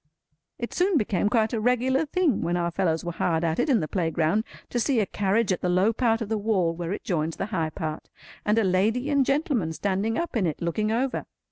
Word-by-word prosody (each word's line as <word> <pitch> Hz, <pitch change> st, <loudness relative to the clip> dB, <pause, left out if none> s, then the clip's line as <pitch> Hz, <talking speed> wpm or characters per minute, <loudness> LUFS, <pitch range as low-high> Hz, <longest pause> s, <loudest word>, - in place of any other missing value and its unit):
It 235 Hz, -, -5 dB
soon 360 Hz, -1 st, +2 dB
became 205 Hz, -4 st, +1 dB
quite 225 Hz, -1 st, +1 dB
a 225 Hz, -, 0 dB
regular 255 Hz, +5 st, +2 dB
thing 330 Hz, -, +1 dB
when 175 Hz, +1 st, 0 dB
our 170 Hz, 0 st, -1 dB
fellows 170 Hz, -2 st, 0 dB
were 175 Hz, -, -2 dB
hard 165 Hz, -1 st, 0 dB
at 165 Hz, -1 st, 0 dB
it -, -, +1 dB
in 245 Hz, -8 st, +3 dB
the 155 Hz, -, -2 dB
playground, 165 Hz, +4 st, 0 dB, 0.3 s
to 240 Hz, -, 0 dB
see 250 Hz, 0 st, +2 dB
a 210 Hz, -, +2 dB
carriage 200 Hz, +2 st, 0 dB
at 185 Hz, -, -1 dB
the 180 Hz, -, 0 dB
low 185 Hz, +5 st, +3 dB
part 225 Hz, -1 st, +1 dB
of 215 Hz, -, -3 dB
the 220 Hz, -1 st, 0 dB
wall 195 Hz, -6 st, +1 dB
where 170 Hz, 0 st, -4 dB
it 200 Hz, -, -4 dB
joins 165 Hz, -3 st, -1 dB
the -, -, -3 dB
high 165 Hz, -3 st, 0 dB
part, 155 Hz, 0 st, -5 dB, 0.3 s
and 210 Hz, +1 st, +2 dB
a 225 Hz, -, +4 dB
lady 215 Hz, +9 st, +1 dB
and 280 Hz, -2 st, +3 dB
gentleman 275 Hz, -, 0 dB
standing 200 Hz, +5 st, -1 dB
up 340 Hz, -4 st, -3 dB
in 200 Hz, -6 st, +2 dB
it, 155 Hz, -, -3 dB
looking 210 Hz, +6 st, -1 dB
over. 250 Hz, +4 st, -1 dB
205 Hz, 235 wpm, -26 LUFS, 175-240 Hz, 0.3 s, a